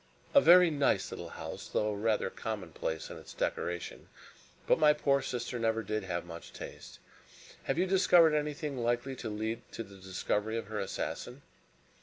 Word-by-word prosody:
"A 280 - +8
very 180 -3 +8
nice 145 -2 +1
little - - -6
house, - - -7
though 105 0 0
rather 110 +2 0
commonplace 90 -7 -4
in - - -8
its - - -12
decoration; 85 0 -3 0.6
but - - +3
my 150 -1 +6
poor 140 -2 +2
sister 125 -1 -3
never 115 0 +1
did 110 +2 -2
have - - -3
much - - -10
taste. - - -9 0.7
Have 135 - 0
you 180 - +3
discovered 180 -4 +5
anything 150 -2 -2
likely 120 +3 0
to 115 - -5
lead 110 +2 -3
to 115 - -4
the 100 -2 -14
discovery 105 +4 -2
of 110 -3 -5
her 110 -1 -3
assassin?" 125 +6 -4
120 Hz, 165 wpm, -31 LUFS, 105-150 Hz, 0.7 s, A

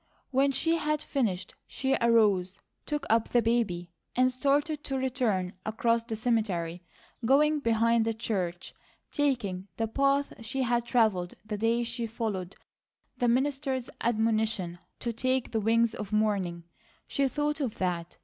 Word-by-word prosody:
When 275 +1 +3
she 325 +5 +2
had 305 -1 0
finished 225 -12 -2
she 265 0 -1
arose, 205 -5 +3 0.3
took 295 -1 -2
up 225 0 +2
the 240 - +3
baby, 200 -7 0 0.2
and 255 +1 +3
started 285 +3 +1
to 270 - -2
return 240 -8 0
across 230 +1 +1
the 230 -1 -4
cemetery, 200 -7 -1 0.4
going 295 +5 +4
behind 230 -2 +2
the 225 - 0
church, 185 -6 -3 0.4
taking 215 -10 0
the 225 - 0
path 275 +4 +1
she 260 +3 -2
had 240 -1 +1
travelled 215 -8 +1
the 215 -1 -3
day 230 +2 +2
she 235 0 -3
followed 210 -5 -3 0.6
the 245 - +2
minister's 265 +1 0
admonition 220 -6 0 0.2
to 235 -1 -2
"take 255 +2 0
the 225 - 0
wings 230 +1 +3
of 210 -1 -6
morning." 200 -5 0 0.4
She 275 -1 +1
thought 295 +2 -1
of 250 -6 -2
that. 175 -2 -2
230 Hz, 145 wpm, -29 LUFS, 210-265 Hz, 0.6 s, going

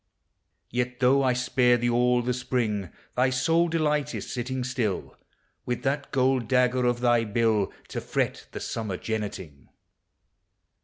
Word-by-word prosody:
Yet, 125 0 -2
tho' 135 +2 +4
I 130 -2 +3
spared 125 -1 +2
thee 120 - +2
all 125 +1 +3
the 125 +1 0
spring, 115 -7 -1 0.3
Thy 125 +1 +3
sole 165 +7 +2
delight 150 -3 0
is, - - -5
sitting 125 +1 -3
still, 110 - -2 0.5
With 120 -1 -3
that 140 +1 -1
gold 130 -2 +1
dagger 125 0 +2
of 120 0 0
thy 120 -1 +3
bill 110 -2 +1 0.2
To - - -4
fret - - -2
the - - -6
summer 105 -5 -3
jenneting. 95 - -5
125 Hz, 145 wpm, -26 LUFS, 115-130 Hz, 0.5 s, tho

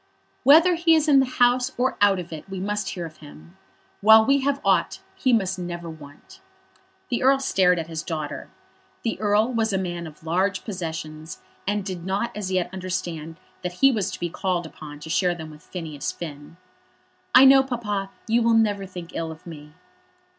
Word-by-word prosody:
"Whether 325 +6 +6
he 335 -1 +4
is 315 -1 +2
in 280 -2 +6
the 265 - +2
House 245 +1 +4
or 255 +2 +1
out 200 -1 +5
of 175 -2 -7
it 160 +4 -9
we 190 -1 -5
must 205 +1 -2
hear 175 -2 -5
of 155 -1 -11
him. 85 - -14 0.5
While 220 +1 +7
we 275 +2 +3
have 280 +1 0
aught - - +2
he 260 - 0
must 190 -5 +1
never 175 -1 -5
want." 145 -2 -14 0.7
The 240 - -1
Earl 270 +1 +5
stared 185 -9 +2
at 165 - -3
his 160 -1 -5
daughter. 155 -2 -5 0.5
The 225 - -2
Earl 215 +3 +2
was 225 -2 +1
a 195 - +1
man 175 -2 -4
of 155 0 -14
large 185 +5 0
possessions, 160 - -6 0.2
and 205 -1 -1
did 185 -4 -5
not 195 +5 -2
as 200 -3 -4
yet 185 -2 0
understand 170 -4 -5 0.2
that 180 -1 -4
he 270 +9 +4
was 210 -7 -1
to - - -7
be 175 -1 -3
called 180 -2 -1
upon 150 -2 -10
to 160 - -9
share 180 0 +2
them 160 -2 -8
with 150 0 -14
Phineas 155 -6 -5
Finn. 150 0 -9 0.8
"I 265 - +9
know, 270 0 +8
Papa, 215 -7 -3 0.2
you 230 +2 +2
will 230 0 +3
never 205 -3 +1
think 180 -2 -9
ill 165 -1 -3
of 160 - -13
me." 150 -3 -11
185 Hz, 195 wpm, -24 LUFS, 165-225 Hz, 0.8 s, I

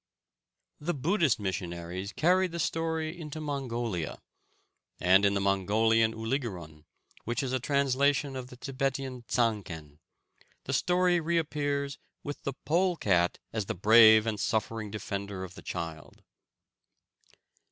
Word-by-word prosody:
The 165 +3 -2
Buddhist 155 - +2
missionaries 90 0 -4
carried 180 +2 +2
the 170 - -4
story 160 0 -1
into 155 -3 -7
Mongolia, 120 - -3 0.8
and 95 +3 +5
in 100 0 +3
the - - +1
Mongolian 110 +4 +2
Uligerun, 105 - -4 0.4
which 120 +4 -1
is 130 -1 -2
a 130 - +1
translation 140 +1 +1
of 130 -1 -5
the 125 - -13
Tibetian 135 -2 -3
Dsanghen, 95 - -1 0.6
the - - -4
story 180 0 +3
reappears 145 -4 -1 0.2
with 145 0 -6
the 140 - -3
pole 180 +3 +2
cat 90 - +2 0.2
as 110 -3 -2
the - - -2
brave 110 +2 +7
and 110 -2 -2
suffering 110 0 -1
defender 100 -2 -5
of 95 -1 -8
the - - -11
child. 80 -2 -6
120 Hz, 125 wpm, -29 LUFS, 100-145 Hz, 0.8 s, brave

